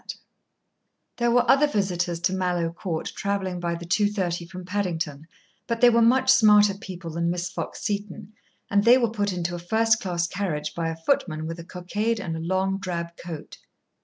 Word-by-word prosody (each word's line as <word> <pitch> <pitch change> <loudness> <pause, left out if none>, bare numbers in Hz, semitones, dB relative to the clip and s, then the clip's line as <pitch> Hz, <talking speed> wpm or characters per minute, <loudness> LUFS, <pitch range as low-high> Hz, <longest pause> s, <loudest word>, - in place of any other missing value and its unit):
Chapter - - -7
Two - - -30 1.0
There 240 0 +2
were 245 +1 +3
other 290 +2 +5
visitors 180 -8 -1
to 180 +2 +1
Mallowe 175 -3 -1
Court 170 -2 -4
travelling 195 -2 -2
by 170 -1 -2
the 170 0 -8
2:30 180 -3 0
from 185 -1 -8
Paddington, 170 -6 -3 0.4
but 230 -1 -1
they 245 0 +7
were 235 0 +4
much 260 +3 +5
smarter 210 -5 +6
people 185 -4 -8
than 170 +1 -1
Miss 180 +1 -2
Fox - - -6
Seton, 205 0 -4 0.4
and 200 0 +3
they 240 +3 +7
were 235 -3 +1
put 205 -2 -1
into 175 -1 -3
a 175 - -4
first 220 +5 +2
class 175 -2 -1
carriage 170 -6 -3
by 165 -1 -2
a 165 - -4
footman 165 - 0
with 165 +1 -5
a - - -7
cockade 205 +6 -2
and 175 -5 -4
a - - -4
long 190 +3 0
drab 170 -3 -4
coat. 170 -4 -9
185 Hz, 190 wpm, -25 LUFS, 170-210 Hz, 1.0 s, they